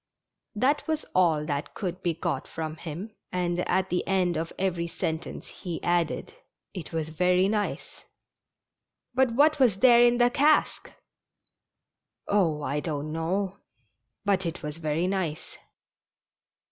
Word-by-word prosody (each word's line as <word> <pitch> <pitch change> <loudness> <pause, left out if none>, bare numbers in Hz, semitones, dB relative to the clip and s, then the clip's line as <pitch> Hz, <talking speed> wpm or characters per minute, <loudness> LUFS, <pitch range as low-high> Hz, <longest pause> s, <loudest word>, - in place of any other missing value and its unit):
That 275 +9 +1
was 315 -1 -1
all 160 -5 +3
that 145 -1 -3
could 180 -2 -4
be 170 -3 0
got - - -2
from 160 -1 -5
him, 175 +8 -6 0.2
and 175 -1 -1
at 190 +1 +1
the 180 - +1
end 185 -2 +2
of 160 +1 -2
every 180 -3 -1
sentence 165 -1 -4
he 175 -4 -6
added: 175 -2 0 0.4
"It 180 -6 -7
was 160 -2 -2
very 180 +3 +3
nice! 210 0 -3 0.4
" - - -58
" - - -60
But 255 -2 +2
what 295 +3 +4
was 240 -8 +4
there 240 +1 +7
in 240 0 +5
the 245 0 +4
cask? 295 +4 +2 0.5
" - - -45
" - - -55
Oh, 165 -7 +2
I 145 +1 -1
don't 150 -1 -3
know, 185 +5 -1 0.7
but 195 -2 +2
it 170 0 -4
was 150 +1 -5
very 160 +1 -1
nice 185 -5 -3
180 Hz, 150 wpm, -27 LUFS, 160-205 Hz, 0.7 s, there